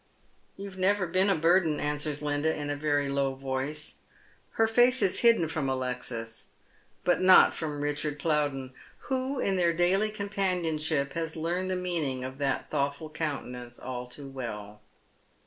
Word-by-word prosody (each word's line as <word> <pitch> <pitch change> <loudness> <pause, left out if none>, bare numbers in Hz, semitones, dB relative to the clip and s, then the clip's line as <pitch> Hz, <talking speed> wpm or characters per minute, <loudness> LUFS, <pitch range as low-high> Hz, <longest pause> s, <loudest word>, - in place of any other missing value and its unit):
" - - -37
You 200 - -6
have 190 -1 -11
never 195 +1 +2
been 185 +3 +2
a 195 - +4
burden," 165 -1 +3
answers 150 0 -2
Linda, 145 +2 +1
in 145 -1 -3
a - - -1
very 145 -1 0
low 140 -1 0
voice. 135 +3 -3 0.6
Her 225 - +3
face 245 +3 +4
is 190 - +2
hidden 230 -8 +5
from 150 -3 -2
Alexis, 125 -3 -4 0.6
but 180 0 +2
not 185 0 +7
from 150 -2 -3
Ricliarvl 145 0 -1
Plowden, 145 -4 -1 0.4
who 260 +1 -1
in 195 -1 +1
their 170 -2 +3
daily 185 +5 +2
companionship 170 -8 0
has 165 -1 -3
learned 175 +3 -2
the 185 - 0
meaning 165 -8 -2
of 130 +1 -7
that 140 -2 -1
thoughtful 140 +3 -2
countenance 125 -6 -5
all 125 -1 -6
too 140 +3 -9
well. 105 -6 -7
150 Hz, 160 wpm, -28 LUFS, 135-180 Hz, 0.6 s, not